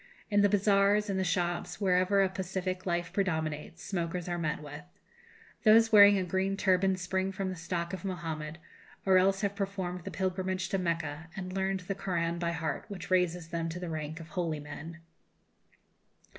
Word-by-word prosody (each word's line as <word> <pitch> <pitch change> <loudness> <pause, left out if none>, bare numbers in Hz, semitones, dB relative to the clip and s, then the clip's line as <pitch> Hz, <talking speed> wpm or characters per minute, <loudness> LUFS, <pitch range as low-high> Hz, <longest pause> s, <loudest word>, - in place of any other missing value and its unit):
In 205 0 +4
the 205 - +5
bazaars, 205 +1 +3
in 190 - -1
the 190 - +1
shops, 175 0 -1
wherever 190 +1 +3
a 190 - +2
pacific 185 0 -3
life 175 -1 -1
predominates, 160 -4 -2
smokers 175 -2 -3
are 175 -1 -2
met 155 -2 -1
with. 145 0 -8 0.8
Those 225 +1 +6
wearing 205 -1 +9
a 190 - 0
green 190 +2 0
turban 190 -1 +3
spring 190 +1 -1
from 190 0 -3
the 185 - -4
stock 170 +1 -3
of 185 - -5
Mohammed, 160 -5 -4 0.5
or 190 -1 +6
else 195 +1 +2
have 200 -1 0
performed 190 -3 -3
the - - -5
pilgrimage 185 -1 -2
to 195 - 0
Mecca 165 -2 -2
and 185 -1 -5
learned 190 0 -1
the 185 +2 -3
Koran 170 -3 -1
by 170 -1 0
heart, 160 -1 -3
which 190 -4 -8
raises 180 -2 +1
them 165 0 -2
to 170 +2 -5
the 180 -1 -5
rank 155 0 -4
of 165 0 -10
holy 170 -5 -2
men. 150 +3 -8
185 Hz, 180 wpm, -30 LUFS, 170-195 Hz, 0.8 s, wearing